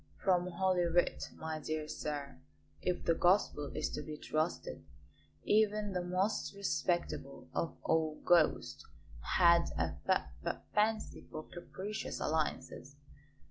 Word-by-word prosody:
"From 180 -2 +3
Holy 180 0 +2
Writ, 170 +1 +1
my 160 -1 -4
dear 155 0 -3
sir. 145 - -5 0.4
If 180 -1 -1
the 165 - +4
Gospel 175 -4 +2
is 155 0 0
to - - -3
be 150 0 -6
trusted, 155 - -2 0.6
even 210 -1 +2
the 180 - 0
most 185 +4 0
respectable 175 -7 -1
of 165 - -2
all 160 -1 +1
Ghosts 170 -3 +3 0.5
had 170 -2 +6
a 80 -1 0
f - - +2
f - - -1 0.2
fancy 215 +1 0
for 155 - -6
capricious 195 +4 -5
alliances. 150 -3 -2
170 Hz, 125 wpm, -34 LUFS, 155-190 Hz, 0.6 s, had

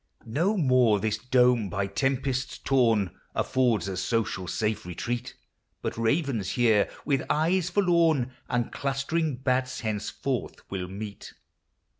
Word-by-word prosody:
No 170 - +1
more 130 - +4
this 110 +1 -1
dome, 125 -3 +3
by 100 +2 -1
tempests 130 +4 -1
torn, 115 -8 +2 0.2
Affords 120 -8 +1
a 95 - -3
social 95 -2 -1
safe 105 +4 -1
retreat; 120 +8 -4 0.5
But - - -2
ravens 115 - 0
here, 115 -4 +3 0.2
with 135 -3 +1
eye 170 +5 +2
forlorn, 170 -7 +2 0.2
And 120 -2 0
clustering 140 +2 -1
bats 130 0 -1
henceforth 110 +3 -3 0.2
will 95 -2 -3
meet. 100 +2 -8
125 Hz, 120 wpm, -27 LUFS, 105-135 Hz, 0.5 s, more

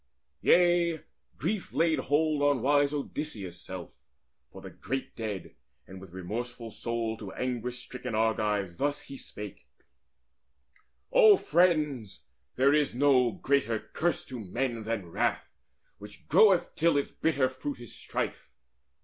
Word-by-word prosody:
Yea, 175 -2 +4 0.4
grief 210 -3 -2
laid 160 -3 +2
hold 150 +2 +1
on 145 -4 +2
wise 145 +1 +3
Odysseus' 140 - -4
self 95 -6 -8 0.6
For - - -11
the - - -10
great 135 +1 -5
dead, 105 -5 -5 0.3
and 95 -1 -11
with 95 - -11
remorseful 115 +6 -5
soul 115 0 -3
To 105 -4 -8
anguish 125 -1 -3
stricken 125 -2 -6
Argives 105 -5 0
thus 145 +1 0
he 275 - -10
spake: - - -9 1.4
"O 450 -5 +7
friends, 150 - +1 0.3
there 135 +2 +4
is 150 -5 +2
no 130 -2 +4
greater 115 +1 +1 0.2
curse 175 +1 0
to 125 -2 -7
men 115 +3 -3
Than 110 -4 -2
wrath, - - -1 0.5
which 105 0 -13
groweth 190 +2 +5
till 165 -2 +3
its 140 - -1
bitter 140 -5 +1
fruit 130 +1 -6
Is 120 -2 -9
strife. - - -4
130 Hz, 130 wpm, -29 LUFS, 110-150 Hz, 1.4 s, O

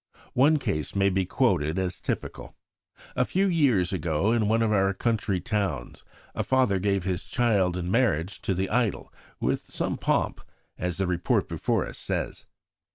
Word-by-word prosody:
One 145 +5 +5
case 75 - -3
may 100 0 +3
be 95 -1 0
quoted 75 +4 +1
as 95 -1 -2
typical. - - -5 0.6
A 125 - +3
few 190 +9 +1
years 130 - +2
ago, 85 +3 0
in 115 -3 +2
one 115 +2 +2
of 110 - +1
our 95 -2 +2
country 110 -3 0
towns, 90 - -3 0.3
a - - -2
father 130 -7 +2
gave 100 -1 0
his 90 -2 -2
child 100 -8 +1
in 90 0 -3
marriage 100 - +1
to 95 - -1
the 95 +2 -2
idol 115 -3 0 0.3
"with - - -1
some - - -2
pomp," - - 0 0.3
as 90 -2 -3
the 95 - 0
report 90 -1 +1
before - - 0
us - - -9
says. - - -3
95 Hz, 165 wpm, -26 LUFS, 90-115 Hz, 0.6 s, One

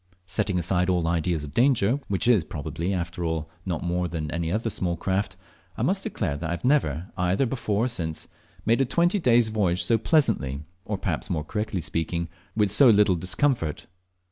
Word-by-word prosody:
Setting 95 +1 0
aside 90 +1 +1
all 90 -2 +1
ideas 85 -1 0
of 75 0 -8
danger, 125 -1 +3
which 100 +3 -1
is 115 -8 +5
probably, 80 +2 -4
after 85 -2 -3
all, 80 -1 -2 0.2
not 85 -4 -2
more 90 0 -1
than 80 -2 -4
in 75 - -4
any 85 0 -2
other 115 +3 -1 0.3
craft, 95 0 -1 0.4
I - - -1
must - - +1
declare 70 - -2
that 80 +2 -4
I 85 - -2
have 85 - -5
never, 95 - +1
either 90 +7 +1
before 115 -3 -1
or - - +1
since, 85 -10 -3 0.4
made 115 +4 +3
a - - +3
twenty 175 - +2
days' 120 -7 +4
voyage 95 -5 +1
so 115 +6 +2
pleasantly, 75 - +1 0.2
or 105 - -2
perhaps, - - -3
more 80 -3 -1
correctly 105 +1 -3
speaking, 85 +1 -2 0.3
with 105 -3 +2
so 125 +5 +7
little 105 -3 +5
discomfort. 90 - 0
90 Hz, 190 wpm, -25 LUFS, 85-110 Hz, 0.4 s, so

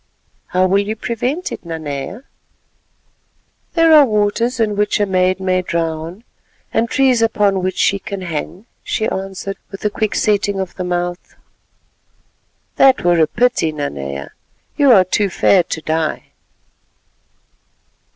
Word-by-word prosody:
"How 185 +1 +1
will 190 +2 +3
you 215 +2 -3
prevent 245 +10 -3
it, - - -7
Nanea?" 160 - -6 1.5
"There 330 -1 +5
are 300 -2 +9
waters 230 +1 0
in 215 -2 +1
which 210 +1 +1
a 205 - +3
maid 185 -1 +1
may 185 -1 +1
drown, 165 +3 -3 0.5
and 230 +1 +1
trees 260 -4 +3
upon 205 -4 +2
which 185 +1 -2
she 200 - +2
can 195 0 -6
hang," 175 +3 -5 0.2
she 220 - -1
answered 195 +1 -5
with 195 +1 -9
a 210 - +1
quick 215 0 -2
setting 205 -1 +1
of 190 -2 -4
the 185 - -5
mouth. 175 0 -3 1.4
"That 265 -1 +5
were 175 -1 +3
a 160 - +4
pity, 240 -6 +1
Nanea, 70 - -5 0.4
you 285 -3 +4
are 190 -5 +6
too 200 +2 0
fair 185 +1 +3
to 165 -1 -5
die." 160 0 -2
195 Hz, 140 wpm, -18 LUFS, 175-220 Hz, 1.5 s, are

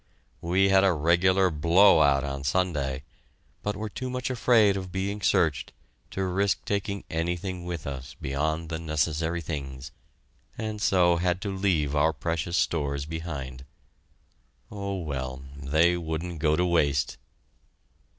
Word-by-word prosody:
We 95 +3 +2
had 95 0 +5
a 95 -2 +4
regular 90 +4 +3
blow 85 +3 +5
out 70 -2 +4
on 70 -1 -4
Sunday, 70 -4 -1 0.6
but 105 0 -2
were 110 +2 -4
too 130 +5 -5
much 125 0 -3
afraid 115 -5 +4
of 95 -2 -5
being 100 +3 -3
searched 80 -6 +1 0.4
to 95 - -3
risk 95 +2 0
taking 100 0 -2
anything 85 +2 -3
with 85 -3 -5
us 65 -2 -6
beyond 80 +4 -2
the 80 -1 -3
necessary 80 +1 -1
things, 70 -5 -6 0.7
and 110 -1 -4
so 90 -4 +4
had 90 +1 0
to 100 -1 -3
leave 80 -7 +1
our 80 +2 +3
precious 85 +4 -2
stores 70 -3 0
behind. 75 -5 -6 1.1
Oh, 100 -1 -4
well 65 -4 -4
they 80 +5 +2
wouldn't 80 0 -4
go 75 -1 +2
to 90 +2 +1
waste! 75 -6 +1
85 Hz, 140 wpm, -27 LUFS, 75-95 Hz, 1.1 s, had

